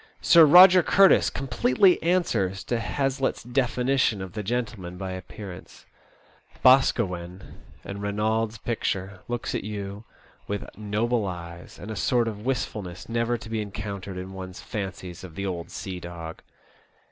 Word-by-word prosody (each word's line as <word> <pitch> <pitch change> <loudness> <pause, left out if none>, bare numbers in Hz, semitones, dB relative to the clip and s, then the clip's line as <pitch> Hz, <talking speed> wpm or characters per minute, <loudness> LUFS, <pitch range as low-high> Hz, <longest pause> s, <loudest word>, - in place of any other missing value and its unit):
Sir 165 -2 +7
Eoger 180 +3 +9
Curtis 195 +3 +5
completely 135 +7 +2
answers 115 - 0
to 120 - -1
Hazlitt's 135 +4 -1
definition 125 -1 +1
of 95 -1 -7
the 110 - -3
gentle 115 +1 -2
man 90 0 -8
by 95 0 -5
appearance. 95 0 -9 0.8
Boscawen, 95 -8 +2 0.2
in 100 +1 -6
Eeynolds* 110 +2 -1
picture, 100 -4 -3
looks 120 -1 -3
at - - -2
you 100 0 -6 0.4
with 100 0 -4
noble 105 +1 -1
eyes, 85 -1 -8
and 105 - -8
a - - -4
sort 120 +3 +1
of 105 -2 -5
wistfulness 105 -8 -3
never 115 +1 0
to 110 - -11
be 110 -1 -2
encountered 100 -2 -6
in 95 +1 -7
one*s 95 -1 -8
fancies 95 -4 -6
of 85 -4 -10
the 100 - -4
old 85 -3 -4
sea 95 -2 -6
dog. 85 -2 -8
105 Hz, 145 wpm, -26 LUFS, 95-120 Hz, 0.8 s, Eoger